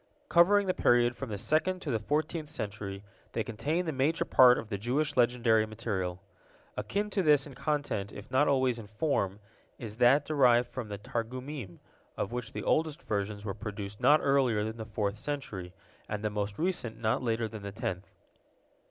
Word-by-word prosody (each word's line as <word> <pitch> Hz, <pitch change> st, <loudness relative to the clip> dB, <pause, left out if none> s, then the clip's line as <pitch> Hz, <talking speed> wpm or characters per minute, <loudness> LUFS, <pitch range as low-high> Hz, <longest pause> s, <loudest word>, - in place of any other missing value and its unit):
Covering 200 Hz, +4 st, +5 dB
the 185 Hz, -, +1 dB
period 120 Hz, -4 st, +3 dB
from 135 Hz, -1 st, -6 dB
the 105 Hz, -, -3 dB
second 160 Hz, -, +1 dB
to 145 Hz, -, -2 dB
the 115 Hz, -, +1 dB
fourteenth 150 Hz, +6 st, -2 dB
century, 100 Hz, -6 st, -5 dB, 0.3 s
they -, -, 0 dB
contain 150 Hz, -, -2 dB
the 160 Hz, -, -1 dB
major 145 Hz, +4 st, +1 dB
part 125 Hz, -1 st, +7 dB
of 110 Hz, -, -6 dB
the 100 Hz, -, -2 dB
Jewish 145 Hz, +7 st, 0 dB
legendary 120 Hz, -3 st, +3 dB
material. 100 Hz, -5 st, -3 dB, 0.6 s
Akin 210 Hz, +1 st, -2 dB
to 195 Hz, -, +1 dB
this 150 Hz, -5 st, +4 dB
in 145 Hz, -, -10 dB
content 140 Hz, -8 st, -2 dB
if 100 Hz, +4 st, -10 dB
not 140 Hz, +3 st, +4 dB
always 130 Hz, -3 st, +2 dB
in 110 Hz, -, -9 dB
form 105 Hz, -4 st, -1 dB, 0.4 s
is 110 Hz, -2 st, -7 dB
that 130 Hz, +4 st, +5 dB
derived 125 Hz, -5 st, +4 dB
from 125 Hz, -4 st, -6 dB
the 100 Hz, -1 st, -5 dB
Targumim, 120 Hz, -, -5 dB, 0.4 s
of -, -, -2 dB
which 120 Hz, -2 st, -4 dB
the -, -, -5 dB
oldest 155 Hz, +1 st, 0 dB
versions 105 Hz, 0 st, -3 dB
were 100 Hz, -, -2 dB
produced 105 Hz, -1 st, -7 dB
not 150 Hz, +1 st, +6 dB
earlier 130 Hz, -6 st, +3 dB
than 110 Hz, +1 st, -4 dB
the 110 Hz, -, -5 dB
fourth 105 Hz, -1 st, -2 dB
century, 110 Hz, -11 st, -5 dB, 0.4 s
and 105 Hz, 0 st, -3 dB
the 105 Hz, -, 0 dB
most 105 Hz, -1 st, -3 dB
recent 155 Hz, -10 st, -2 dB
not 110 Hz, +2 st, +1 dB
later 115 Hz, -2 st, 0 dB
than 110 Hz, -1 st, -8 dB
the 100 Hz, 0 st, -6 dB
tenth. 100 Hz, -4 st, -4 dB
120 Hz, 185 wpm, -30 LUFS, 105-145 Hz, 0.6 s, part